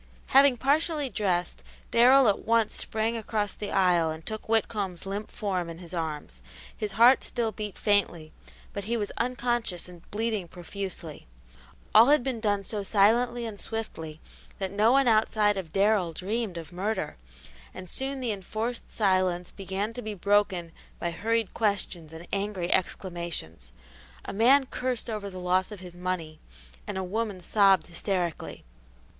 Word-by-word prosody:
Having 270 -1 +6
partially 295 +2 +1
dressed, 190 -5 -1 0.3
Darrell 255 +2 +6
at 205 - +3
once 230 -1 +2
sprang 220 +1 0
across 215 -2 -2
the 205 - -6
aisle 180 -4 +3
and 160 0 -6
took 215 0 -5
Whitcomb's 205 -5 0
limp 200 +2 -4
form 185 -5 -2
in 165 - -7
his 175 0 -10
arms. 150 - -4 0.3
His 210 -1 -4
heart 240 +4 +6
still 235 -3 -1
beat 210 -3 -6
faintly, 180 -7 0 0.4
but 200 -1 -5
he 235 +2 0
was 205 -2 -2
unconscious 240 -7 0
and 175 -2 -12
bleeding 215 -3 -2
profusely. 175 - -6 0.7
All 225 +3 +8
had 290 -2 +5
been 255 -3 -2
done 205 -2 0
so 210 +1 -3
silently 235 +5 +3
and 215 -3 -5
swiftly 160 -9 -5 0.4
that 190 -1 -3
no 210 +3 +4
one 270 0 +4
outside 215 -2 +3
of 185 -5 -5
Darrell 195 -3 +2
dreamed 200 +2 -3
of 165 +1 -8
murder, 190 - -2 0.5
and 185 - -9
soon 265 +7 -2
the 240 -3 0
enforced 215 +4 -4
silence 185 -4 +1
began 195 +3 -3
to 245 - -6
be 215 -2 -5
broken 195 -3 +1 0.3
by 170 - -2
hurried 225 +3 -1
questions 195 -7 -1
and 165 +2 -10
angry 195 -3 0
exclamations. 170 - -3 0.5
A - - -5
man 260 +7 +5
cursed 250 -2 -3
over 210 -2 -4
the 185 - -9
loss 185 +2 +1
of 210 - -7
his 180 -1 -10
money 175 -3 -4 0.5
and - - -3
a 190 - -1
woman 205 +1 -2
sobbed 195 +1 +4
hysterically. 175 -1 -3
200 Hz, 155 wpm, -28 LUFS, 180-225 Hz, 0.7 s, All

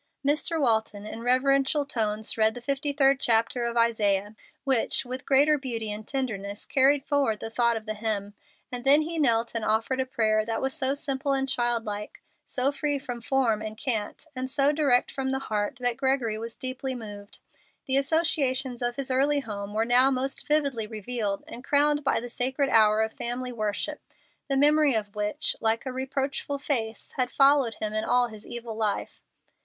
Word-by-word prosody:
Mr. 305 +3 +1
Walton, 220 -5 +1
in 220 +1 -7
reverential 275 +3 +2
tones, 220 -5 -1
read 220 0 +2
the - - -6
fifty 280 +3 -1
third 275 -1 +3
chapter 235 0 +2
of 235 0 -2
Isaiah, 210 -3 +1 0.3
which, 265 0 +1
with 255 +1 -7
greater 290 +2 +4
beauty 230 -5 -4
and 210 +1 -7
tenderness, 210 -7 -3
carried 275 +1 +3
forward 275 -7 +1
the 225 - -6
thought 235 0 +2
of 215 - -8
the 215 - -3
hymn; 210 -2 -3 0.4
and 245 -1 -4
then 285 +3 +6
he 330 +1 -4
knelt 235 -5 +2
and 230 -1 -2
offered 225 +5 0
a 260 - 0
prayer 215 -4 +1
that 225 +1 -2
was 265 0 -2
so 270 +1 0
simple 280 0 -2
and 270 0 0
child 240 -3 +1
like, 210 0 -6 0.3
so 260 +2 +1
free 290 +1 -1
from 245 -3 -6
form 235 -4 +1
and 215 0 -6
cant, 225 +1 -2
and 255 0 -4
so 275 +1 +2
direct 285 -5 +2
from 265 -1 -3
the 265 - 0
heart, 215 -2 -2
that 245 -1 -1
Gregory 265 -5 +1
was 230 +1 -6
deeply 260 0 -4
moved. 205 -3 -9 0.5
The 265 0 +2
associations 275 -4 +1
of 240 0 -1
his 270 0 -3
early 280 +3 +2
home 200 -4 -6
were 220 +1 +1
now 250 +3 +5
most 270 0 -2
vividly 280 -7 0
revealed 215 -2 -3
and 245 - -9
crowned 290 +1 +2
by 275 - +2
the 240 - -6
sacred 260 +3 -1
hour 215 -1 +5
of 220 - -3
family 250 +1 -4
worship, 220 +6 -3 0.5
the 275 -2 0
memory 295 -1 +4
of 205 -2 -2
which, 210 +8 -1
like 225 +2 +1
a 260 - -3
reproachful 270 +2 -2
face, 230 -6 -3
had 250 -1 +1
followed 275 -5 +4
him 215 -1 -4
in 215 0 -1
all 245 +1 +3
his 215 -1 -12
evil 235 -2 -6
life. 215 -2 -2
245 Hz, 190 wpm, -26 LUFS, 220-275 Hz, 0.5 s, then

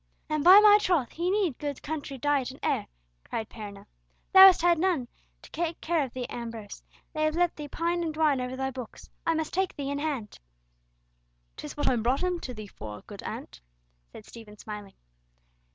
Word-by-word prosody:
"And 305 -1 0
by 370 +4 +10
my 420 0 +7
troth, 345 - +1
he 345 +2 -2
needs 380 - 0
good 290 -2 -5
country 290 -3 -5
diet 280 -1 0
and 265 - -11
air!" - - 0 0.4
cried 220 -1 -4
Perronel. 205 -2 -9 0.5
"Thou 380 0 +12
hast 365 -3 +4
had 345 -2 +4
none 335 -9 +1 0.4
to - - -14
take 335 0 -3
care 330 -2 0
of 260 - -6
thee, 255 -1 -4
Ambrose. 230 -3 -7 0.3
They 310 -1 -1
have 310 0 +1
let 350 0 +1
thee 300 -1 -7
pine 340 +4 -1
and 325 - -2
dwine 305 -4 +2
over 250 +1 -4
thy 265 0 -2
books. 255 -3 -10 0.2
I 330 - +3
must 320 -1 -3
take 380 0 0
thee 280 -1 -4
in 285 - -2
hand." 280 -9 -4 1.2
"'Tis 150 - -8
what 290 - -1
I - - +4
brought 245 +7 0
him 360 -1 0
to 255 - -6
thee 215 -1 -7
for, 105 - -9
good - - -10
aunt," - - -8 0.5
said - - -12
Stephen, 215 -3 -13
smiling. 210 -2 -9
290 Hz, 200 wpm, -28 LUFS, 240-340 Hz, 1.2 s, Thou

